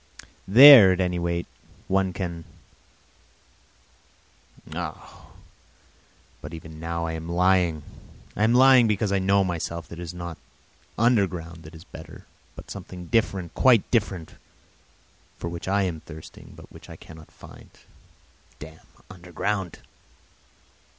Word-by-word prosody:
There, 115 -2 +9
at 90 - -5
any 90 -1 -1
rate, 85 0 -2 0.4
one 95 -1 0
can... 85 -3 -6 2.3
Oh, 80 -1 -8 1.1
but 75 +2 -9
even 80 -1 -11
now 85 +1 -4
I 80 - -3
am 80 +1 -7
lying! 90 -3 +1 0.5
I 105 - -1
am 115 +2 +3
lying 130 -2 +6
because 105 -1 -1
I 100 - +1
know 100 +1 +2
myself 85 -3 -5
that 85 - -10
it - - -7
is 85 -1 -6
not 85 -2 -8 0.6
underground 95 -8 0
that 80 +1 -13
is 80 - -13
better, - - -13 0.3
but - - -12
something 90 -2 -10
different, 100 -7 0
quite 125 -6 +3
different, 95 -8 -2 1.0
for 85 - -6
which 85 +1 -8
I 100 +1 +1
am 85 -4 -3
thirsting, 80 0 -13
but - - -15
which - - -15
I - - -10
cannot 80 -1 -15
find! - - -16 0.9
Damn 80 +1 -12 0.3
underground! 90 +1 -5
90 Hz, 130 wpm, -24 LUFS, 85-100 Hz, 2.3 s, There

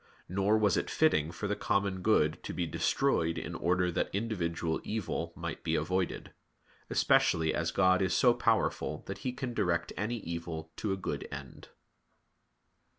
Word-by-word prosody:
Nor 100 +4 +2
was 105 -4 +3
it - - -1
fitting 75 +1 +2
for 95 +5 -4
the 105 - 0
common 100 -2 0
good 85 -6 +2
to - - -6
be 90 - 0
destroyed 80 0 +1
in - - -5
order 90 0 +1
that 85 - -1
individual 85 -6 -1
evil 95 -6 -3
might - - -5
be - - 0
avoided; 90 +3 -1 0.6
especially 80 -1 +3
as 85 -1 0
God 95 +2 +3
is 95 -1 +1
so 125 -2 +6
powerful 115 -2 0
that - - -6
He 130 - -2
can 125 -1 -4
direct 85 -6 0
any 110 +4 -2
evil 85 -1 -5
to 105 - -2
a 95 - 0
good 95 - -4
end. - - -9
90 Hz, 160 wpm, -31 LUFS, 85-105 Hz, 0.6 s, so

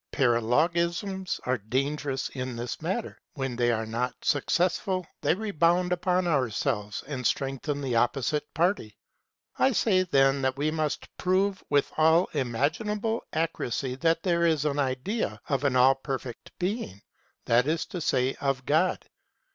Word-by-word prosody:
Paralogisms 170 - +1
are 130 -1 0
dangerous 135 +5 -2
in 130 -2 -5
this 120 +4 -5
matter; 190 +8 -3 0.2
when 135 -3 -3
they 120 0 +2
are 110 -1 -1
not 120 +3 -2
successful 180 +5 +1 0.2
they - - +2
rebound 180 -3 +1
upon 180 +1 +1
ourselves 115 -8 -1
and 135 -3 -5
strengthen 140 +2 -2
the 130 -3 -1
opposite 135 +5 0
party. 165 - 0 0.6
I 265 - +4
say 195 -4 +3
then 135 -5 +3
that 130 0 0
we 150 +2 0
must 155 -2 -3
prove 190 +2 +1
with 145 -1 +2
all 160 +3 +4
imaginable 170 - -1
accuracy 145 -5 -2
that 165 +2 +1
there 170 -2 +2
is 155 -3 +1
an 145 -1 0
idea 140 - -1
of 140 -1 0
an 135 -2 +2
all 130 +1 +6
perfect 135 -2 -6
being, 180 - -3 0.4
that 120 +3 +3
is 160 +1 0
to 180 - -3
say 130 -2 +1
of 135 -2 -1
God. 165 +5 +1
145 Hz, 145 wpm, -27 LUFS, 130-175 Hz, 0.6 s, all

